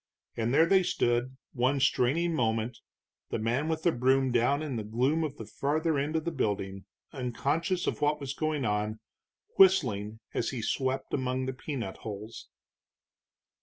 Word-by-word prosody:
And 115 +1 0
there 160 +5 +5
they 190 +2 +5
stood 120 -5 0 0.2
one 130 +3 +1
straining 140 +6 +2
moment, 115 -3 0 0.5
the - - -1
man 120 +7 0
with 160 -1 -2
the 170 - +4
broom 130 0 +2
down 125 +5 +2
in 145 -5 -3
the 110 - -2
gloom 130 +9 +1
of 150 -4 -4
the 110 - -7
farther 155 +5 0
end 150 +3 -2
of 160 0 0
the 170 - 0
building, 100 -8 -2 0.3
unconscious 140 +8 -1
of - - -2
what 150 +1 +2
was 140 -2 -4
going 155 -3 -1
on, 105 +1 -1 0.6
whistling 110 - +4
as 115 - 0
he 125 -4 -4
swept 130 +3 -1
among 130 -1 -1
the 130 - -2
peanut 125 -6 -5
hulls. 105 +1 -8
130 Hz, 165 wpm, -29 LUFS, 115-150 Hz, 0.6 s, there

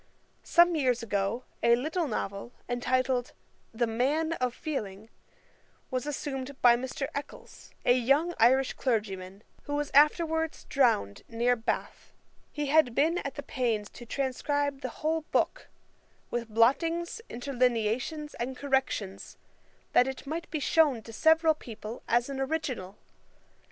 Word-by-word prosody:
Some 345 0 +4
years 250 -6 +1
ago 205 +2 -1 0.2
a 235 0 +5
little 315 +7 -1
novel, 200 -1 -4
entitled 250 0 0 0.4
The 235 +1 0
Man 280 +8 0
of 255 -5 -1
Feeling, 220 - -5 0.8
was 255 +2 -2
assumed 275 -2 -4
by 240 -1 +7
Mr. 260 +3 -3
Eccles, 285 - -8 0.2
a 245 - +6
young 275 +8 +2
Irish 260 +3 +4
clergyman, 200 -5 -2 0.2
who 290 - -2
was 295 0 -2
afterwards 320 +2 +3
drowned 230 - +1
near 240 +2 +2
Bath. 225 -1 -4 0.4
He 295 -1 -3
had 280 -4 +3
been 330 +5 +2
at 280 - -5
the 285 - -6
pains 230 -7 -1
to 240 - -11
transcribe 280 +2 -1
the 255 - -3 0.2
whole 320 +1 +2
book, - - 0 0.6
with 235 -1 -3
blottings, 330 - +2
interlineations, 250 +3 -1
and 255 +2 -3
corrections, 265 -8 -2 0.6
that 250 - +5
it 265 +1 -5
might 325 +4 -4
be 310 - -2
shewn 290 -6 +3
to 225 - -11
several 320 +6 +4
people 230 -5 -9
as 240 +1 +2
an 275 -1 -5
original. 265 -9 -3
260 Hz, 135 wpm, -29 LUFS, 235-295 Hz, 0.8 s, by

